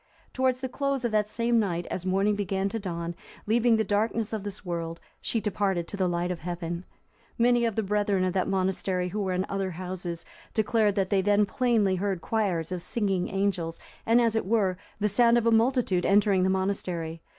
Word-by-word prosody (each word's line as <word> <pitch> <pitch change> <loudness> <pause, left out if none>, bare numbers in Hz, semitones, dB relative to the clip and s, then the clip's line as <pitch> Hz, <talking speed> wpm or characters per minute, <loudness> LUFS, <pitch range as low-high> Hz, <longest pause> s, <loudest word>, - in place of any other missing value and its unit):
Towards 260 -1 +1
the 260 - -1
close 275 0 -1
of 235 - 0
that 210 -1 +1
same 235 +1 +1
night, 175 -5 -1
as 185 0 -3
morning 195 +3 +2
began 195 -1 -1
to 225 - -3
dawn, 170 -3 -4 0.3
leaving 230 +2 +3
the 220 - +2
darkness 220 +1 0
of 215 - -2
this 205 0 -7
world, 170 -1 -4 0.2
she 230 - -1
departed 195 -5 -1
to - - -4
the 190 -2 +1
light 175 0 -1
of 175 - -4
heaven. 175 +1 -4 0.5
Many 240 0 +4
of 225 -3 -1
the 220 - 0
brethren 205 -1 +1
of 185 -1 0
that 185 -1 0
monastery 185 -1 0
who 210 +4 -3
were 190 -2 -1
in 185 +1 0
other 195 -1 -2
houses, 180 -1 -5 0.3
declared 220 -2 +2
they 195 0 +1
had 190 - +1
then 205 0 +4
plainly 215 -5 +1
heard 195 -1 -1
choirs 185 -6 -1
of 180 -1 -3
singing 195 -1 -1
angels, 190 -4 -1 0.2
and, 230 +2 +4
as 230 -2 +2
it 220 - 0
were, 200 -4 +2 0.2
the 210 - +2
sound 235 +3 +4
of 235 - +1
a 230 - +4
multitude 225 -5 +2
entering 200 -1 +4
the 185 - +2
monastery. 180 -4 -2
195 Hz, 205 wpm, -27 LUFS, 180-220 Hz, 0.5 s, Many